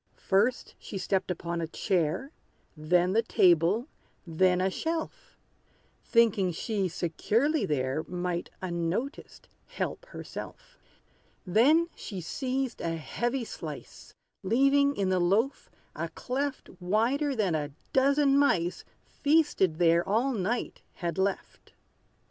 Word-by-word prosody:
First, 215 +6 +1
she 200 - -7
stepped 190 0 -1
upon 170 -1 -3
a 165 - -2
chair; 180 - -1 0.4
Then 175 +4 +2
the 225 - +4
table 185 - +3 0.4
then 180 +2 +2
a 190 +1 +1
shelf; 325 - -4 0.7
Thinking 215 -6 +3
she 195 +3 -1
securely 210 - 0
there 135 0 0
Might, 180 -1 -3
unnoticed, 175 - -3 0.2
help - - -4
herself. - - -9 0.7
Then 270 - +4
she 195 -4 -7
seized 260 - -3
a 165 -1 -1
heavy 240 - -2
slice, - - -9 0.3
Leaving 275 +7 +3
in 195 -2 0
the 185 -1 +2
loaf 205 +10 +1 0.3
a - - -3
cleft 275 +2 -3
Wider 240 +10 +1
than 200 -7 +1
a 150 -2 -1 0.2
dozen 275 +1 +4
mice, 180 -11 +1 0.2
Feasted 290 - +2
there 170 0 +4
all 240 +6 +2
night, 220 +3 -2
had 170 +1 -3
left. 195 0 -3
200 Hz, 115 wpm, -28 LUFS, 175-270 Hz, 0.7 s, the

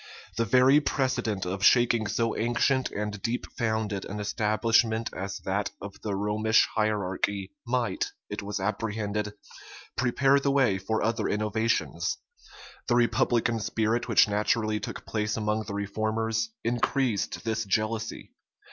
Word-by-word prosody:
The 115 - +1
very 130 +4 +5
precedent 130 -9 -1
of 95 +2 -3
shaking 120 -2 +4
so 115 +2 0
ancient 120 +3 +1
and 105 -1 -4
deep 120 +4 -2
founded 110 -4 -1
an 105 +2 -5
establishment 110 +2 +1
as 100 +1 -4
that 100 +3 -1
of 100 0 -9
the 105 -2 -2
Romish 105 +2 +3
hierarchy, 100 -2 -1 0.2
might, 120 -5 0 0.2
it - - -5
was 105 0 -4
apprehended, 105 0 -2 0.6
prepare 135 +2 +3
the 140 - 0
way 130 -9 +3
for 110 +3 -1
other 115 0 0
innovations. 110 +2 0 0.7
The 120 - +3
republican 120 -1 +2
spirit 110 +3 0
which 115 - +5
naturally 105 +1 +1
took - - -7
place 105 0 -1
among 105 0 -1
the 100 -1 -5
reformers, 110 +2 -1
increased 120 -1 0
this 110 -1 -1
jealousy. 110 +2 -2
110 Hz, 130 wpm, -27 LUFS, 105-115 Hz, 0.7 s, very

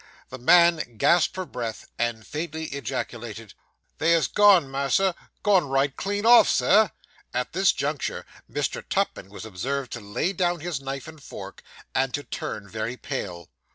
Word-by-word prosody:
The 130 - -8
man 170 -2 +4
gasped 170 +10 +3
for 185 -1 -3
breath, 115 -8 -5
and 115 -2 -1
faintly 160 0 -4
ejaculated 120 -5 -5 0.5
'They 165 +1 +4
ha' - - -2
gone, 200 -7 +6
mas'r! 140 +8 +1 0.3
gone 195 -6 +4
right 135 0 +1
clean 205 +2 -2
off, 240 +1 +8
Sir!' 210 +1 +4 0.5
(At 125 0 -2
this 190 +2 +4
juncture 140 0 -3 0.3
Mr. - - -2
Tupman 95 - -1
was 105 +2 -9
observed 130 +6 -3
to 120 - -5
lay 105 - -2
down 175 -2 0
his 165 -5 -3
knife 135 0 -5
and 160 -2 -12
fork, - - -9 0.3
and 130 -1 +1
to 145 - -4
turn 100 -6 -5
very 110 +4 -4
pale.) 90 - -5
140 Hz, 155 wpm, -25 LUFS, 120-175 Hz, 0.5 s, off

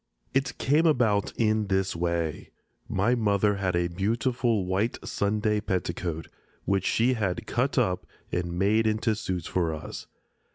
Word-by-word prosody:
It 135 -1 0
came 155 +5 +3
about 115 -9 +2
in 110 -2 +2
this 95 -2 0
way. 85 -2 -2 0.4
My 100 +6 +2
mother 105 -3 +2
had 95 -2 0
a 85 0 +2
beautiful 110 +3 0
white 95 +6 0
Sunday 105 +1 0
petticoat, 85 -4 -2 0.4
which 95 -1 +1
she 120 +3 +3
had 100 -6 -2
cut 130 +5 0
up 95 -8 +1 0.2
and 85 0 -2
made 110 +4 +3
into 110 +1 +1
suits 95 -5 -3
for 85 -3 0
us. 75 - -8
100 Hz, 140 wpm, -27 LUFS, 90-115 Hz, 0.4 s, came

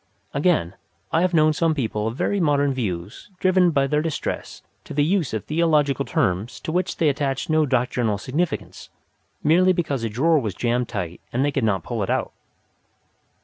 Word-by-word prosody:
Again, 140 - +1 0.4
I 165 - +2
have 180 -1 +1
known 155 -1 +4
some 160 0 +1
people 110 -5 -2
of 115 - -3
very 200 +8 0
modern 145 -4 +2
views 100 - -4
driven 185 -1 +4
by 140 -4 +2
their 150 +2 +1
distress 160 -1 -4 0.2
to - - -9
the 145 - +3
use 170 -2 +1
of 110 -2 -4
theological 150 -4 +2
terms 110 - -1
to - - -4
which 180 +2 -1
they 160 - +2
attached 140 0 -1
no 155 -1 +3
doctrinal 120 -4 0
significance, 150 - -3 0.5
merely 180 +4 +4
because 145 -8 -2
a 115 - -1
drawer 155 +9 +3
was 105 -8 -3
jammed 120 +2 0
tight 90 -6 -5
and 130 +3 +1
they 145 - +1
could 135 - -1
not 100 -6 +1
pull - - -3
it - - -2
out. - - -1
140 Hz, 185 wpm, -23 LUFS, 120-160 Hz, 0.5 s, known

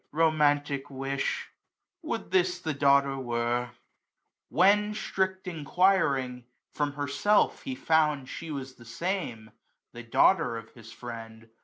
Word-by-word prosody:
'^ - - -45
Romantic 145 -3 +2
wish! 135 0 -3 0.5
would 295 -9 -4
this 180 -1 +2
the 160 -3 -2
daughter 140 -1 +3
were 120 0 -1 0.4
!'' - - -56
When, 210 +3 +4
strict 190 -3 -2
enquiring, 145 -7 +1 0.3
from 145 -1 -1
herself 145 +9 +1
he 265 -1 -5
found 155 - +2
She 165 +4 -7
was 135 -3 -5
the 120 - -14
same, 120 - -4 0.4
the 120 - -8
daughter 115 +2 +3
of 115 0 -10
his 115 -1 -14
friend. 115 -2 -9
140 Hz, 130 wpm, -28 LUFS, 125-180 Hz, 0.5 s, When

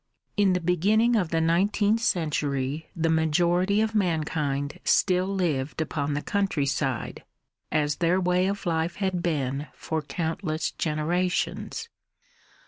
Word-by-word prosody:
In 200 -3 +3
the 180 - +1
beginning 205 +8 +2
of 185 -7 +1
the 165 - +1
nineteenth 200 +6 +2
century 150 - -1
the 165 -1 0
majority 175 +5 +2
of 220 0 0
mankind 155 -7 -1
still 185 -1 +3
lived 160 -9 -1
upon 145 -2 -1
the 145 - -2
countryside, 140 - -1 0.5
as 150 -1 +1
their 175 +2 +2
way 180 0 +2
of 200 0 -3
life 165 0 0
had 190 -3 -1
been 145 -4 -1
for 160 0 -3
countless 160 +1 -2
generations. 175 - -1
170 Hz, 125 wpm, -26 LUFS, 150-185 Hz, 0.5 s, In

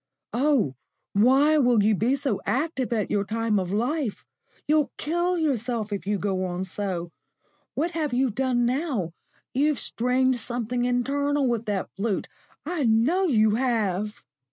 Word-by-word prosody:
"Oh, 250 - +2 0.4
why 270 +9 +5
will 245 -6 +4
you 215 +1 +4
be 230 +7 +2
so 275 -7 -2
active 265 -2 -1
at 220 -3 -1
your 200 - +2
time 220 0 0
of 185 -1 -3
life? 245 +3 -1 0.4
You'll 305 -1 +2
kill 345 +3 0
yourself 240 -8 -1
if 200 -1 -5
you 205 0 +1
go 190 -1 -1
on 180 0 -2
so. 185 -3 -4 0.6
What 330 +5 0
have 315 -4 -2
you 255 0 +1
done 245 +1 +1
now? 250 - -1 0.4
You've 290 +2 +2
strained 250 +2 +1
something 245 +1 -2
internal 280 +3 +1
with 235 -2 -1
that 200 -2 -2
flute 200 0 -1 0.4
I 325 -1 -1
know 255 +13 +3
you 220 -7 +4
have." 215 -4 -1
245 Hz, 150 wpm, -25 LUFS, 210-280 Hz, 0.6 s, why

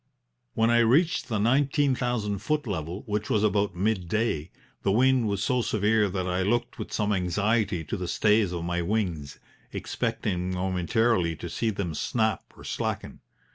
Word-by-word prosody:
"When 115 +1 +3
I 120 - +5
reached 135 +5 +3
the 110 - 0
nineteen 135 +5 +2
thousand 115 -5 -1
foot 150 +8 -1
level, 90 -3 -4
which 105 0 -2
was 105 -1 +2
about 105 -2 +1
midday, 95 -3 0 0.3
the 95 - +1
wind 125 +2 +3
was 100 -2 -1
so 125 +1 +1
severe 105 -1 +2
that 95 -1 -2
I 90 0 0
looked 120 +5 0
with - - -6
some 105 -1 0
anxiety 100 +1 0
to 80 - -4
the 90 -2 -4
stays 105 +1 +2
of 85 -2 -3
my 85 0 -1
wings, 85 -7 -2 0.3
expecting 90 -1 -2
momentarily 90 0 +1
to - - -7
see 115 - 0
them 95 -6 -3
snap 110 +7 -1
or - - -12
slacken. - - -4
105 Hz, 165 wpm, -27 LUFS, 90-115 Hz, 0.3 s, I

